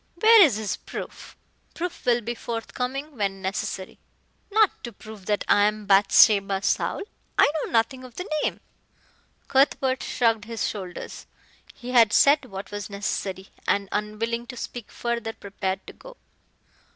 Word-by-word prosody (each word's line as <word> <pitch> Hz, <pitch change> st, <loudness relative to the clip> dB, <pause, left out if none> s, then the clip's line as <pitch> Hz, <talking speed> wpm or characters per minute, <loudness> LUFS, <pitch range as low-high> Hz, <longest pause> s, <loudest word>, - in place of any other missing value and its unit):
"Where 440 Hz, +4 st, +7 dB
is 290 Hz, -, +6 dB
his 215 Hz, -3 st, -3 dB
proof?" -, -, -9 dB, 0.4 s
"Proof 345 Hz, -5 st, -5 dB
will 240 Hz, -1 st, +3 dB
be 235 Hz, +2 st, -3 dB
forthcoming 250 Hz, +5 st, -5 dB
when 195 Hz, -2 st, -1 dB
necessary." 190 Hz, 0 st, -4 dB, 0.5 s
"Not 430 Hz, 0 st, +2 dB
to 235 Hz, -, -6 dB
prove 215 Hz, -2 st, -12 dB
that 210 Hz, -1 st, 0 dB
I 205 Hz, -, +5 dB
am 210 Hz, 0 st, -1 dB
Bathsheba 195 Hz, 0 st, +5 dB
Saul. -, -, 0 dB, 0.3 s
I -, -, +7 dB, 0.2 s
know -, -, -6 dB
nothing 235 Hz, +3 st, +1 dB
of 250 Hz, -2 st, -12 dB
the 360 Hz, -, -5 dB
name." -, -, -2 dB, 0.9 s
Cuthbert 265 Hz, -1 st, +2 dB
shrugged 225 Hz, -3 st, +1 dB
his 230 Hz, 0 st, -2 dB
shoulders. 185 Hz, -4 st, -7 dB, 0.5 s
He 250 Hz, 0 st, -7 dB
had 230 Hz, -4 st, +5 dB
said 285 Hz, 0 st, +5 dB
what 195 Hz, -4 st, -8 dB
was 205 Hz, 0 st, -5 dB
necessary 200 Hz, -1 st, -4 dB, 0.2 s
and, 200 Hz, 0 st, +1 dB
unwilling 230 Hz, +3 st, -2 dB
to 250 Hz, -, -8 dB
speak 235 Hz, -1 st, -7 dB
further, 235 Hz, -2 st, -3 dB
prepared 195 Hz, -2 st, -4 dB
to -, -, -10 dB
go. -, -, -14 dB
225 Hz, 150 wpm, -25 LUFS, 200-250 Hz, 0.9 s, Where